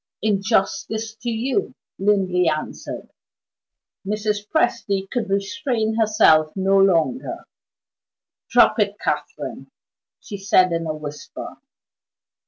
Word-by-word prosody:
"In 205 -3 +2
justice 220 +1 -1
to 240 +2 -4
you," 250 - -1 0.2
Linley 190 -3 +2
answered. 155 0 -5 0.9
Mrs. 210 +1 -2
Presty 210 -9 0
could 220 -1 -3
restrain 220 +3 -1
herself 210 -9 +4
no 195 0 +3
longer. 195 - +1 1.0
"Drop - - +5
it, - - +1
Catherine!" - - -4 0.5
she 205 - -8
said 185 -2 +3
in 165 -1 -1
a 155 - -2
whisper. 150 -1 -8
200 Hz, 100 wpm, -22 LUFS, 190-220 Hz, 1.0 s, Drop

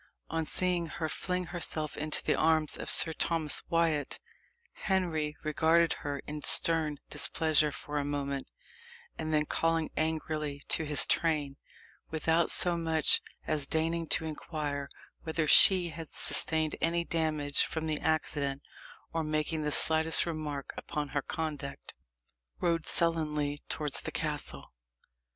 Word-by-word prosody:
On 160 -1 -2
seeing 180 -2 0
her 160 0 -4
fling 180 +3 -3
herself 155 -3 -2
into 155 0 -3
the - - +1
arms 155 -1 +2
of - - -6
Sir 160 - +7
Thomas 160 -2 0
Wyat, 165 -3 0 0.6
Henry 160 -6 -2
regarded 160 +1 +2
her 145 -1 -4
in 150 0 -6
stern 155 -1 +5
displeasure 155 -2 +2
for 145 +1 -5
a - - -2
moment, 140 -1 -4 0.7
and 155 0 -3
then 150 -1 +1
calling 165 +1 -1
angrily 155 -2 -3
to 160 - 0
his 150 -1 +6
train, 150 -4 0 0.5
without 160 +1 +1
so 175 -1 +3
much 160 -2 +3 0.2
as 150 -3 +1
deigning 165 +1 -1
to 160 - +2
inquire 150 -2 -5 0.3
whether 160 -1 -2
she 180 +2 +6
had 160 0 -8
sustained 155 +2 -1
any 170 +1 +1
damage 155 -4 +1
from 160 -1 -4
the 155 -1 -2
accident, 145 -3 -1 0.5
or 165 -1 -1
making 155 +1 -2
the 150 0 -2
slightest 160 +2 +5
remark 150 -4 -5
upon 150 -1 -4
her 145 +1 -2
conduct, 150 -2 -6 0.7
rode 170 -2 -1
sullenly 150 -3 0
towards 150 -3 -1
the - - -5
castle. - - -5
155 Hz, 135 wpm, -30 LUFS, 150-165 Hz, 0.7 s, Sir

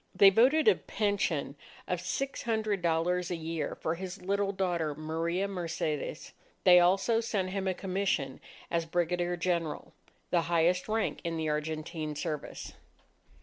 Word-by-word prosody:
They 195 -1 +8
voted 265 - +4
a 435 - +9
pension 195 -9 -1 0.3
of 180 -1 -1
six 275 +9 -3
hundred 215 -4 0
dollars 175 +1 +1
a 175 - -1
year 160 -2 -3
for 160 - -2
his 185 +2 -6
little 200 +2 0
daughter, 175 -6 -1
Maria 165 +5 -1
Mercedes. 165 -5 -3 0.3
They 180 -1 +8
also 195 +6 +3
sent 200 -5 -1
him 195 0 -2
a 185 - 0
commission 185 -9 -1 0.3
as 170 -1 +1
Brigadier 175 +1 0
General, 170 -3 -2 0.4
the 175 - +4
highest 175 +2 +2
rank 220 0 0
in 170 -1 -2
the 160 -1 -1
Argentine 155 0 -3
service. 150 0 -5
175 Hz, 145 wpm, -30 LUFS, 160-195 Hz, 0.4 s, a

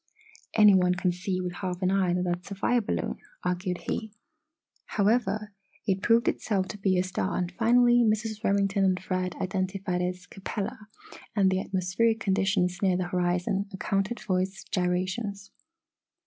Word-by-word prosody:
"Any 210 -2 +7
one 180 -1 +4
can 185 -1 +1
see 185 +1 -3
with 180 -1 -3
half 180 0 -4
an 185 - +3
eye 190 -2 +2
that 180 - 0
that's 175 0 -3
a 200 - -5
fire 240 +5 +2
balloon!" 210 - -2 0.3
argued 180 0 -2
he. 220 -1 -2 0.8
However, 215 -1 +1 0.3
it 190 -1 0
proved 230 +2 +3
itself 195 -4 0
to 205 - -7
be 190 -2 +2
a 180 - +3
star 175 - -2
and 180 -1 -1
finally, 240 +4 +4
Mrs. 215 0 0
Remington 200 0 +2
and 185 -1 +2
Fred 185 -2 -2
identified 185 -1 -2
it - - +1
as 180 - -17
Capella 210 +3 -5 0.5
and 195 -3 +4
the 190 0 +1
atmospheric 195 +5 0
conditions 190 -2 +1
near 190 -3 +3
the 180 -1 -2
horizon 180 +2 0
accounted 195 +3 -1
for 185 -3 0
its 190 +1 -4
gyrations. 190 +3 -2
190 Hz, 160 wpm, -27 LUFS, 180-210 Hz, 0.8 s, Any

